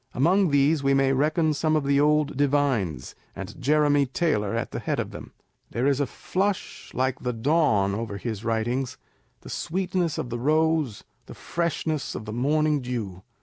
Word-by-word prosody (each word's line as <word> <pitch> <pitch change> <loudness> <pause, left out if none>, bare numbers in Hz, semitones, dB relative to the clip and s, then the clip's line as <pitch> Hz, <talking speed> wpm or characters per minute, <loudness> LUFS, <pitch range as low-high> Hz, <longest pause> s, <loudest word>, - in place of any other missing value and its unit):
Among 180 +8 +3
these 145 +2 +3
we 135 0 +3
may 135 0 +3
reckon 155 +3 +2
some 155 +2 +1
of 155 - +1
the 140 0 +2
old 150 0 +2
divines, 130 - 0 0.2
and - - -8
Jeremy 145 0 +3
Taylor 115 -8 0
at 115 - -2
the - - -4
head - - -2
of - - -3
them. - - -9 0.4
There 120 +4 -1
is 140 -1 +2
a 140 - +1
flush 195 +8 -3
like 130 0 0
the 125 -1 -2
dawn 115 -6 +2
over 105 -1 -4
his 110 -1 -5
writings; 120 +3 -1 0.4
the - - -11
sweetness 180 -1 -1
of 120 - -4
the 120 - -3
rose, 155 -3 +1 0.2
the - - -10
freshness 160 -3 -2
of 110 - -6
the 105 - -5
morning 150 +4 +1
dew. 110 -7 -4
140 Hz, 175 wpm, -25 LUFS, 120-155 Hz, 0.4 s, Among